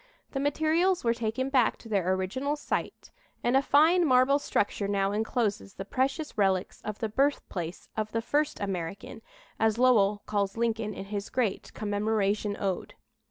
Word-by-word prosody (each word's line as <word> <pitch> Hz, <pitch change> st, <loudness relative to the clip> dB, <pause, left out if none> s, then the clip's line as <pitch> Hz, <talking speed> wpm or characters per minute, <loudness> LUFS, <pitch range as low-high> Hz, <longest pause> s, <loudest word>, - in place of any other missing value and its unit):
The 270 Hz, -, -2 dB
materials 315 Hz, +6 st, +1 dB
were 230 Hz, -1 st, +3 dB
taken 235 Hz, +3 st, -2 dB
back 255 Hz, -5 st, +3 dB
to -, -, -13 dB
their 195 Hz, -4 st, +1 dB
original 260 Hz, +11 st, -1 dB
site, 295 Hz, -, -4 dB, 0.3 s
and 245 Hz, -, +2 dB
a 270 Hz, -, +5 dB
fine 315 Hz, +6 st, +4 dB
marble 265 Hz, -1 st, +4 dB
structure 205 Hz, -6 st, -1 dB
now 200 Hz, -1 st, +1 dB
encloses 210 Hz, -, -1 dB
the 195 Hz, -, -6 dB
precious 270 Hz, +7 st, -1 dB
relics 190 Hz, -2 st, +1 dB
of 215 Hz, -1 st, -5 dB
the 220 Hz, -, -2 dB
birthplace 205 Hz, -, -1 dB
of 215 Hz, -1 st, -2 dB
"the 230 Hz, +1 st, -1 dB
first 295 Hz, +4 st, 0 dB
American," 190 Hz, -2 st, -5 dB, 0.4 s
as 220 Hz, 0 st, +2 dB
Lowell 210 Hz, -5 st, +4 dB
calls 200 Hz, 0 st, -1 dB
Lincoln 225 Hz, -3 st, -1 dB
in 195 Hz, -, -6 dB
his 200 Hz, 0 st, -4 dB
great 235 Hz, -6 st, -1 dB
"Commemoration 205 Hz, -1 st, 0 dB
Ode." 195 Hz, -3 st, -3 dB
220 Hz, 160 wpm, -28 LUFS, 200-265 Hz, 0.4 s, a